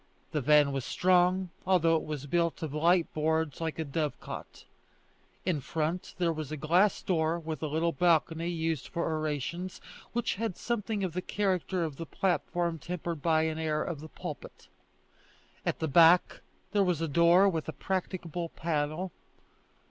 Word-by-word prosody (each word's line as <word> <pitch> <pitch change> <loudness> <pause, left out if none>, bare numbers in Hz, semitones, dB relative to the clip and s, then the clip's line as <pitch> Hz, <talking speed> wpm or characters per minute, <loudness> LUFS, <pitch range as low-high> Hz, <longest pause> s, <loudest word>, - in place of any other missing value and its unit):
The 150 - 0
van 150 +1 +5
was 135 -2 -2
strong, 180 +2 +2
although 170 -3 +3
it 160 - +1
was 150 -2 -5
built 170 +2 0
of 150 -3 -4
light 170 +3 +3
boards 160 0 0
like 160 -1 -2
a 160 - -2
dove 150 +1 -2
cot. - - -9 0.8
In 170 -6 0
front 160 +5 -3
there 170 -2 +1
was 155 -2 -5
a 155 - -3
glass 175 +8 +2
door 165 -2 +1
with 160 -3 -5
a 155 - -1
little 160 +3 +1
balcony 165 +1 +2
used 165 -4 -2
for 170 -1 -2
orations, 155 +4 -3 0.3
which 240 0 0
had 220 -6 -2
something 220 -3 -2
of 180 -4 -2
the 180 - -2
character 185 -3 0
of 155 -4 -4
the 165 - -6
platform 175 -2 -1
tempered 170 -1 -4
by 160 -1 +3
an 160 0 -1
air 155 -1 0
of 170 -4 -4
the 155 +1 -9
pulpit. - - -8 1.0
At - - 0
the 160 - -1
back 165 +4 +5 0.3
there 205 -1 +3
was 180 -4 +1
a 165 - -1
door 170 +5 +5
with 165 -5 -1
a - - -1
practicable 175 0 -3
panel. 160 +3 -2
165 Hz, 170 wpm, -30 LUFS, 155-180 Hz, 1.0 s, van